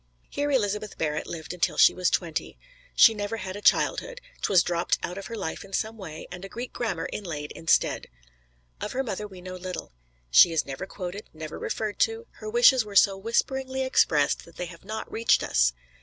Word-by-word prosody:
Here 290 0 -1
Elizabeth 210 -5 0
Barrett 150 -1 -2
lived 160 0 -6
until 180 -1 0
she - - +7
was 180 -1 +1
twenty. 165 -3 -2 0.4
She 225 - +8
never 205 +1 -3
had 190 -3 -5
a 205 - -7
childhood - - +2 0.2
't - - 0
was 185 -3 +5
dropped 170 -1 0
out 180 +3 -4
of 195 - -8
her 230 - -6
life 190 -7 -4
in 195 0 -14
some 220 +3 -1
way, 165 -7 -8
and 180 +1 -8
a 195 - -7
Greek 240 +5 -6
grammar 235 -2 -2
inlaid 155 -7 -5
instead. 165 - +1 0.7
Of - - -4
her 265 - 0
mother 210 -3 -4
we 190 -3 -12
know 185 0 -7
little. 185 - -6 0.4
She 165 - +8
is 160 - 0
never 140 +8 -6
quoted; 190 +2 -7
never 155 -1 -7
referred 215 -2 -3
to; 450 +1 +1
her 430 - -6
wishes 430 - +6
were 205 -1 -10
so 195 0 +6
whisperingly 260 +5 -1
expressed 150 - +2
that 170 - -17
they 180 - -4
have 170 -1 -12
not 215 +3 -6
reached 230 +1 +3
us. 60 -1 +3
195 Hz, 200 wpm, -26 LUFS, 170-225 Hz, 0.7 s, She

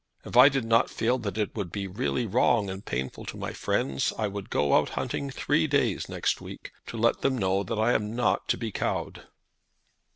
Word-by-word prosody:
If - - -7
I 125 +3 +9
did 135 -4 -1
not 115 0 +3
feel 125 +3 0
that 105 -3 -4
it 105 -2 -2
would 100 -6 -4
be 100 0 -3
really 120 +5 -1
wrong 105 0 +2
and 95 +1 -7
painful 65 +2 -4
to - - -7
my - - -5
friends 65 -1 0
I 110 - 0
would 100 -1 -6
go 70 -1 +1
out - - +4
hunting 140 - -2
three 145 +4 +1
days 135 -8 0
next - - -1
week, - - -9 0.2
to 115 - -6
let 115 +1 +2
them 135 -1 +1
know 95 -2 +1
that 105 +3 -3
I 110 +3 +3
am 105 +1 -1
not 120 - +1
to - - +1
be 115 -2 -4
cowed." - - -3
110 Hz, 215 wpm, -27 LUFS, 100-125 Hz, 0.2 s, I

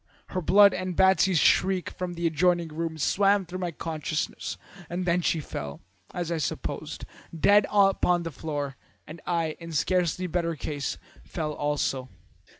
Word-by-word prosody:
Her 185 - -2
blood 200 +4 +6
and 185 -2 -3
Batsy's 190 -1 +4
shriek 185 +3 +3
from 180 -1 -5
the 170 0 -3
adjoining 170 +1 +2
room 160 +1 -4
swam 195 +5 +2
through 180 +2 -6
my 180 -1 -2
consciousness, 155 -1 -4 0.3
and 180 +1 -3
then 180 0 +2
she 165 - +1
fell, 75 - -6 0.3
as 175 -1 -3
I 165 - -1
supposed, 155 - -4 0.3
dead 205 +4 +5
upon 195 -3 +3
the 165 - -4
floor, 145 -1 -4 0.3
and 155 +1 -10
I, 165 -3 -1
in 165 -1 -8
scarcely 180 +2 +1
better 170 -1 -1
case, 145 -1 -4 0.3
fell 155 -3 -4
also. 145 -3 -1
170 Hz, 150 wpm, -27 LUFS, 155-185 Hz, 0.3 s, blood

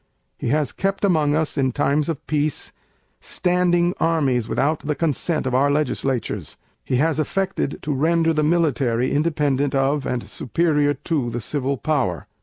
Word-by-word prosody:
He - - -5
has 145 +3 +1
kept 195 +1 -1
among 155 -6 +2
us, 155 -2 -1
in 130 -2 +1
times 145 +2 +1
of 160 -1 -4
peace, 150 -1 -1 0.5
Standing 175 -1 +1
Armies 140 -8 +1
without 150 +3 +1
the 150 0 -2
Consent 160 0 0
of 130 - -1
our 135 +3 +3
legislatures. 135 -3 -1 0.3
He - - -1
has 155 +3 +1
affected 185 -1 -1
to 150 - -1
render 165 +3 +2
the 155 - +1
Military 140 -7 +1
independent 145 -3 +1
of 135 +1 +1
and 125 -2 -2
superior 145 +1 0
to 140 -2 -2
the 120 +1 -3
Civil 140 +3 -2
Power. 130 - -1
150 Hz, 155 wpm, -22 LUFS, 135-160 Hz, 0.5 s, our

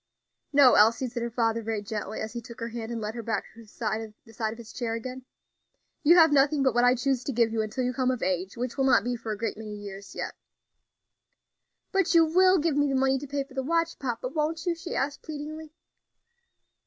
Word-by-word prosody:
"No, 280 -3 +7
Elsie," 230 +4 +4
said 240 0 -5
her 235 - -2
father, 230 -1 0
very 220 -2 -3
gently, 210 0 -4
as 220 +1 -5
he 235 - -4
took 235 +1 -12
her 230 0 -4
hand 230 0 -6
and 235 - -3
led 215 0 -4
her 235 - -5
back 225 0 -2
to 230 - -14
the 225 - -16
side 220 0 -4
of 225 - -9
his 230 -2 -11
chair 230 -2 -2
again, 255 +2 -6 0.8
"you 325 +3 +6
have 325 -2 +7
nothing 280 0 +3
but 265 -3 +3
what 240 - +3
I 245 +1 +5
choose 260 0 0
to 275 - -3
give 230 -2 +2
you, 225 - +1
until 215 +4 -2
you 250 0 -1
come 255 0 0
of 255 -2 -1
age, 185 +2 -2
which 250 +3 -4
will 270 - +3
not 260 -7 +5
be 245 +1 -1
for 225 -2 -5
a 210 - -3
great 225 0 -3
many 215 -1 -7
years 200 -1 -9
yet." - - -4 1.6
"But 385 -3 +2
you 330 -1 +7
will 370 +4 +5
give 320 -2 +1
me 290 0 +3
the 270 - 0
money 265 0 +2
to 290 - -8
pay 280 0 -2
for 270 -1 -18
the 265 - -1
watch 330 +4 0
papa, 250 -1 -3
won't 310 +2 -2
you?" 350 - +2
she 335 +1 -6
asked, 280 +2 -1
pleadingly. 310 +1 -7
245 Hz, 235 wpm, -27 LUFS, 225-285 Hz, 1.6 s, No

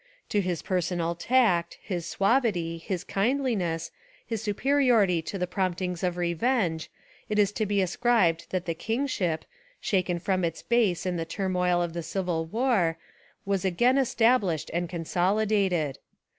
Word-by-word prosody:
To 205 - +2
his 180 -3 -2
personal 175 -2 -1
tact, 180 -3 +2
his 175 -4 -4
suavity, 195 -7 +1
his 180 +1 -4
kindliness, 195 -8 -1 0.3
his 225 -3 -3
superiority 225 - +2
to 180 +5 -5
the 180 - 0
promptings 180 -1 -2
of 180 -1 -1
revenge. 175 -1 0 0.4
It 210 - -1
Is 205 -1 +4
to 215 0 -2
be 200 -1 +2
ascribed 180 -4 +2
that 185 -1 -2
the 170 - -1
kingship, 210 - -1 0.3
shaken 180 -3 0
from 185 +1 -1
its 165 -1 -2
base 215 -7 +1
in 180 -1 -1
the 165 - -2
turmoil 180 0 0
of 170 -1 -4
the 170 - -3
Civil 165 -1 -2
war, 210 -6 +1 0.5
was 195 -2 0
again 240 +9 +3
established 230 - +2
and 175 0 -1
consolidated. 180 -2 0
185 Hz, 145 wpm, -27 LUFS, 170-215 Hz, 0.5 s, Is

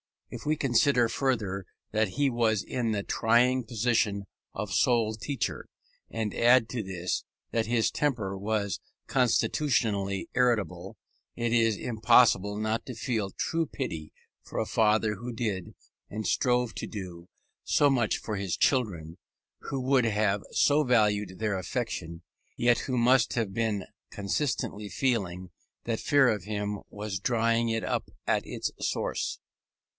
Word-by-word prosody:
If - - -8
we 155 +1 +2
consider 125 -2 +3
further 110 -7 -1 0.3
that 110 0 +2
he 140 +8 +1
was 115 -4 +1
in 120 -3 -2
the 100 -2 -1
trying 125 +4 +2
position 110 -3 0 0.3
of 100 -1 -4
sole 110 +2 +3
teacher, 115 +2 -3 0.4
and 110 -2 -3
add 120 -1 +4
to 125 - -2
this 95 -3 -3 0.3
that 115 -1 +1
his 115 -1 +2
temper 115 -10 -1
was 100 -1 -1 0.3
constitutionally 115 - +1
irritable, 105 -7 0 0.4
it 120 -1 -1
is 115 -2 +3
impossible 110 -3 +3
not 110 +1 -1
to 125 - -7
feel 115 -3 -1
true 165 - -1
pity 80 - -5 0.3
for - - -9
a - - +1
father 110 -1 +2
who 120 +5 -6
did, 105 -7 -3 0.3
and 110 +1 -5
strove 125 +4 +1
to - - -4
do, 90 -5 -8 0.4
so 145 - +3
much 120 -6 +1
for 105 -2 -4
his 95 -3 -2
children, 90 - 0 0.5
who 135 -1 -3
would 130 -1 +3
have 105 -2 +1
so 150 +1 +4
valued 105 -6 +2
their 105 -4 -1
affection, 90 -6 -4 0.3
yet 120 0 +3
who 130 -2 -2
must 120 0 +4
have 110 -5 -1
been 105 -3 -1 0.3
constantly 105 -1 -2
feeling 95 -7 -1 0.3
that 115 -1 -2
fear 145 -3 +4
of 105 -5 -1
him 105 -1 -3
was 105 -2 -4
drying 115 +1 +1
it 115 -1 -1
up - - -2 0.2
at - - +1
its - - -3
source. - - -2
110 Hz, 140 wpm, -28 LUFS, 100-125 Hz, 0.5 s, add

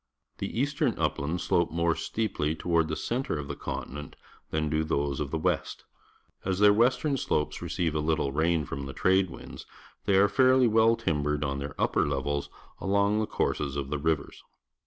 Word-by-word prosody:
The - - -3
eastern 140 -1 0
uplands 80 +5 -1
slope 85 - +2
more 85 +1 +2
steeply 80 -9 -2
toward 85 -1 +1
the 80 - -2
centre 120 - -2
of 70 -1 -5
the - - -4
continent 65 +2 -6 0.3
than 80 0 -1
do 75 +1 +1
those 70 -3 -1
of 75 - -2
the 80 - -2
west. 80 - -2 0.6
As 95 -1 -1
their 105 0 +6
western 130 +6 +2
slopes 75 -10 -1
receive 85 -3 -1
a 75 - 0
little 75 -2 0
rain 80 +1 +1
from 70 +1 -5
the 70 - -6
trade 95 0 +2
winds, - - -10 0.4
they 100 - +3
are 100 +1 +6
fairly 130 +2 +4
well 115 +1 +4
timbered 75 -6 -1
on 70 -1 -2
their 70 0 -6
upper - - +2
levels 70 +1 -2 0.3
along 100 +2 +2
the 110 - 0
courses 70 -2 -1
of 70 -1 -4
the 75 - -1
rivers. 75 -1 -2
80 Hz, 180 wpm, -28 LUFS, 75-100 Hz, 0.6 s, their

